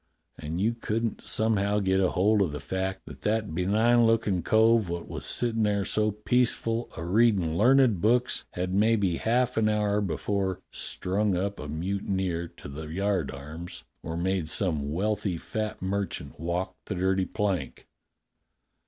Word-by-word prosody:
And 80 +3 -5
you 110 +4 +2
couldn't 115 0 -2
somehow 105 -2 +1
get 95 -2 +2
hold 100 +3 +3
o' 95 - +3
the 75 -2 -5
fact 95 +3 -3
that - - -11
that 110 -4 0
benign 110 +7 +3
lookin' 110 -5 +2
cove 110 +1 +4
wot 85 0 -4
was - - -6
sittin' 115 -2 0
there 100 -2 +1
so 110 0 +1
peaceful 115 +1 0
a 80 - -4
readin' 95 -4 +3
learned 120 -2 +4
books 125 +4 +2
had 90 +1 -2
maybe 100 -4 +2
half 125 +2 +1
an 110 -1 +3
hour 105 -1 +1
before 95 +1 -1
strung 95 +1 -1
up 100 +2 -2
a 75 - -6
mutineer 90 +1 -2
to - - -12
the 75 +3 -7
yardarms 80 -3 -3 0.2
or 80 +2 -5
made 90 -2 -1
some 75 -3 0
wealthy 100 +1 -1
fat 110 +3 -4
merchant 100 -3 -3
walk 90 +3 -2
the - - -3
dirty 95 +1 +1
plank. 105 -4 -2
100 Hz, 150 wpm, -27 LUFS, 90-110 Hz, 0.2 s, cove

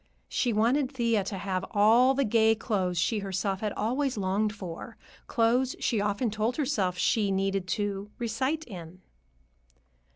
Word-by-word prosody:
She 245 - 0
wanted 250 +6 +2
Thea 230 -5 +1
to 200 0 -4
have 190 0 -2
all 235 +5 +5
the 275 - +2
gay 225 0 +4
clothes 190 -6 -1
she 210 +6 +1
herself 195 0 -2
had 210 -1 -1
always 255 +4 -1
longed 200 +2 0
for; 200 +2 -8 0.3
clothes 245 +3 +2
she 225 -5 0
often 205 +3 0
told 220 +3 -1
herself 195 - 0
she 210 +2 +2
needed 195 -1 0
"to 205 0 -2
recite 260 +7 -1
in." 180 - -10
215 Hz, 150 wpm, -28 LUFS, 195-235 Hz, 0.3 s, all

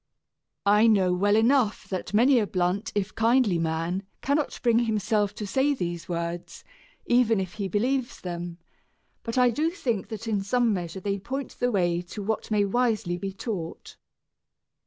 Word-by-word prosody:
I 210 +3 +5
know 190 -5 +4
well 205 +3 +2
enough 230 0 +2
that 185 -2 -4
many 245 +5 +5
a 210 - 0
blunt 180 +3 -1
if 205 0 -1
kindly 225 -5 +3
man 165 +3 -1 0.2
cannot 285 +2 0
bring 235 -2 +4
himself 215 -2 0
to 210 - -5
say 270 +7 +1
these 175 -7 -4
words, 170 0 -4 0.4
even 240 -3 +3
if 185 -2 -4
he 200 -2 -3
believes 245 +6 -1
them, 175 -1 -5 0.6
but 230 +2 -4
I 250 -1 +5
do 305 +8 +1
think 245 - -2
that 220 0 -7
in 210 -3 0
some 235 +3 +2
measure 175 -1 -4
they 200 +1 -2
point 270 +7 -5
the 245 - +2
way 175 -4 +1
to 190 +4 -8
what 220 +1 -2
may 210 -2 +2
wisely 215 -5 0
be 195 +1 -4
taught. 190 -5 -6
210 Hz, 165 wpm, -26 LUFS, 180-240 Hz, 0.6 s, I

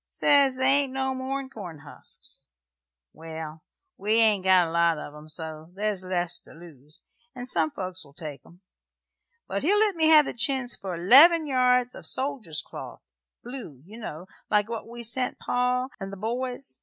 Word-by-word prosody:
Sez 275 -3 +3
they 260 - 0
ain't 275 0 +3
no 265 0 -1
more'n 265 +1 -4
corn 180 - -9
husks. 145 - -9 0.7
Well, 160 -1 -8 0.4
we 210 +3 0
ain't 220 -4 +4
got 185 -1 +5
a - - -2
great - - -7
lot 170 -1 +3
of 145 - -8
'em, 150 +1 -13
so 155 0 -6
there's 205 -2 -2
less 175 -1 -1
to - - -17
lose, 155 -3 -14 0.3
and 245 -1 -6
some 165 -10 +2
folks 185 +2 -5
will 140 -1 -19
take 145 -5 -7
'em; 175 +2 -19 0.9
but - - -2
he'll 395 +7 +3
let 425 -1 +3
me 320 -2 +2
have 310 -2 +7
the - - -4
chintz 250 0 +1
for 185 -3 -5
'leven 305 - +7
yards 250 -2 +2
o' - - -10
soldier's 225 - -2
cloth - - -10 0.4
blue, 235 - -9
ye 210 +4 -13
know, 180 -7 -7 0.2
like 210 -1 +2
what 230 -1 -6
we 235 +1 -8
sent 250 +3 -1
pa 250 +1 0
and 195 -1 -6
the 195 - -8
boys. 245 +5 -3
215 Hz, 180 wpm, -26 LUFS, 170-260 Hz, 0.9 s, have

